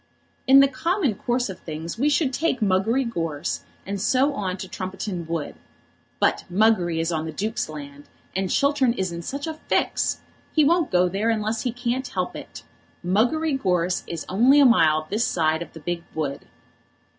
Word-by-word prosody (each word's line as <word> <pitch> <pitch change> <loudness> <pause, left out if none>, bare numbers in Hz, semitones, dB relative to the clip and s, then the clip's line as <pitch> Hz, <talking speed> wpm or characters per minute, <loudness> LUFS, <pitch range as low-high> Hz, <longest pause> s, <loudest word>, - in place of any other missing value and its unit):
"In 270 +1 +8
the 275 - +6
common 320 - 0
course 245 +4 -1
of 190 - -8
things 160 +5 -6
we 285 +4 +3
should 285 -3 +1
take 320 0 0
Muggery 215 +6 +2
Gorse, 165 -8 -3 0.2
and 200 0 -4
so 270 +6 +2
on 190 -6 -3
to 190 - -6
Trumpeton 185 -2 -5
Wood. 165 -3 -3 0.7
But - - +2
Muggery 180 -4 +3
is 165 +1 0
on 160 -1 -2
the 160 - -4
Duke's 215 +3 -3
land, 145 -1 -9 0.3
and 190 0 -1
Chiltern 280 -1 +2
is 190 -6 -2
in 170 0 -5
such 280 +11 -5
a 320 - -3
fix! - - 0 0.3
He 310 -2 +4
won't 335 0 +3
go 180 0 +3
there 200 +5 -1
unless 220 0 0
he 245 - -1
can't 245 +2 -2
help - - -3
it. - - -9 0.4
Muggery 245 - +2
Gorse 180 -7 0
is 170 -2 -5
only 245 +9 +5
a 285 - +7
mile 155 -10 +4
this 215 +3 +1
side 160 -1 +1
of 170 - -7
the 160 - -10
big 170 +2 -3
wood." 145 -3 -3
200 Hz, 180 wpm, -24 LUFS, 170-255 Hz, 0.7 s, In